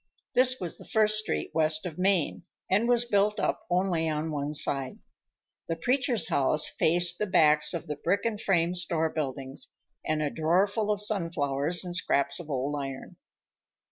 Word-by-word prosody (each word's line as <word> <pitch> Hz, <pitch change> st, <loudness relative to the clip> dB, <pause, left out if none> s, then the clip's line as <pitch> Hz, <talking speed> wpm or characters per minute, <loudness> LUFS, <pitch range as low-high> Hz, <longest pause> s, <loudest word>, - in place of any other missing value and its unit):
This 255 Hz, 0 st, +5 dB
was 175 Hz, -3 st, -6 dB
the -, -, -13 dB
first 215 Hz, -1 st, +2 dB
street 215 Hz, -, -3 dB
west 155 Hz, 0 st, +1 dB
of 175 Hz, -1 st, -6 dB
Main, 185 Hz, -3 st, +1 dB, 0.3 s
and 215 Hz, +5 st, +2 dB
was 240 Hz, -1 st, +3 dB
built 210 Hz, -1 st, +1 dB
up -, -, -2 dB
only 175 Hz, -3 st, 0 dB
on 155 Hz, +1 st, -3 dB
one 145 Hz, 0 st, -3 dB
side. 135 Hz, -3 st, +1 dB, 0.7 s
The 165 Hz, -, -2 dB
preacher's 245 Hz, -, +1 dB
house 145 Hz, +3 st, +2 dB
faced 175 Hz, +1 st, +2 dB
the 210 Hz, -, -1 dB
backs 150 Hz, -5 st, +4 dB
of 170 Hz, -, -5 dB
the 150 Hz, -1 st, -5 dB
brick 180 Hz, +9 st, -1 dB
and 220 Hz, -2 st, -2 dB
frame 175 Hz, -2 st, +1 dB
store 165 Hz, -3 st, -1 dB
buildings 135 Hz, -2 st, -4 dB, 0.4 s
and 155 Hz, -1 st, -1 dB
a 145 Hz, -, -2 dB
draw 170 Hz, +5 st, +2 dB
full 210 Hz, +1 st, -3 dB
of 205 Hz, -1 st, 0 dB
sunflowers 165 Hz, -5 st, 0 dB
and 175 Hz, -1 st, -5 dB
scraps 140 Hz, -5 st, 0 dB
of 165 Hz, -3 st, -10 dB
old 140 Hz, +1 st, -2 dB
iron. 135 Hz, -1 st, -8 dB
170 Hz, 175 wpm, -27 LUFS, 150-200 Hz, 0.7 s, This